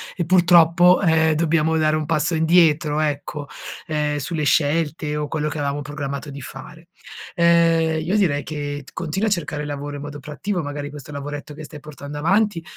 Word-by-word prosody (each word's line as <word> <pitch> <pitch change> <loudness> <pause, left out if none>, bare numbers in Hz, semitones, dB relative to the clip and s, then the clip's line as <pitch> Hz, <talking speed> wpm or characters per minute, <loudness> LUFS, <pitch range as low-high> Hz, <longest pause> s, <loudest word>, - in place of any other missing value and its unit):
e, 175 - -2
purtroppo, 175 0 +5
ehm, 160 -3 +3
dobbiamo 160 0 +1
dare 155 -1 +2
un 155 0 -2
passo 165 +2 0
indietro, 160 -2 +3
ecco, 145 -1 -3 0.4
ehm, 150 -1 -1
sulle 155 +2 -3
scelte 150 0 +1
o 150 0 -2
quello 150 0 -2
che 150 0 -4
avevamo 145 0 -2
programmato 140 -1 -5
di 140 - -8
fare. 155 +6 -11 0.5
Ehm, 165 -2 +3
io 185 +6 0
direi 155 -8 +2
che 145 -1 -5
t - - -15
continua 185 +5 -2
a 210 - 0
cercare 150 -5 -2
lavoro 145 0 -5
in - - -8
modo 145 0 -7
proattivo, 150 +7 -4
magari 145 0 -5
questo 145 -1 -10
lavoretto 145 +1 -6
che 155 +1 -9
stai 150 0 -10
portando 145 0 -9
avanti, 190 +3 +1
155 Hz, 180 wpm, -21 LUFS, 145-165 Hz, 0.5 s, purtroppo